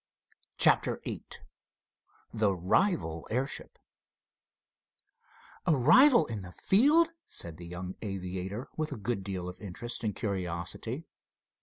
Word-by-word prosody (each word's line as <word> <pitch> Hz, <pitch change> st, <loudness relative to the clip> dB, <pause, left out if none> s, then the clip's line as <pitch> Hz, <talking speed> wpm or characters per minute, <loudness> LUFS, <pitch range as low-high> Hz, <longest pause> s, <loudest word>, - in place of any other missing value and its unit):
CHAPTER -, -, +4 dB
VIII -, -, -5 dB, 1.1 s
THE 105 Hz, -4 st, +2 dB
RIVAL 90 Hz, -, +1 dB
AIRSHIP 130 Hz, +5 st, -3 dB, 1.9 s
"A 160 Hz, -, +5 dB
rival 235 Hz, -, +7 dB
in 110 Hz, -6 st, -5 dB
the 90 Hz, -1 st, -9 dB
field?" 300 Hz, -, +4 dB, 0.2 s
said 85 Hz, -2 st, -5 dB
the 85 Hz, 0 st, -9 dB
young 90 Hz, +1 st, -6 dB
aviator, 95 Hz, +3 st, -4 dB
with 155 Hz, -1 st, -2 dB
a -, -, -3 dB
good 105 Hz, -1 st, -2 dB
deal 95 Hz, -2 st, -4 dB
of 90 Hz, +3 st, -8 dB
interest 110 Hz, +5 st, -5 dB
and 105 Hz, -3 st, -1 dB
curiosity. 95 Hz, -, -3 dB
105 Hz, 115 wpm, -30 LUFS, 90-140 Hz, 1.9 s, rival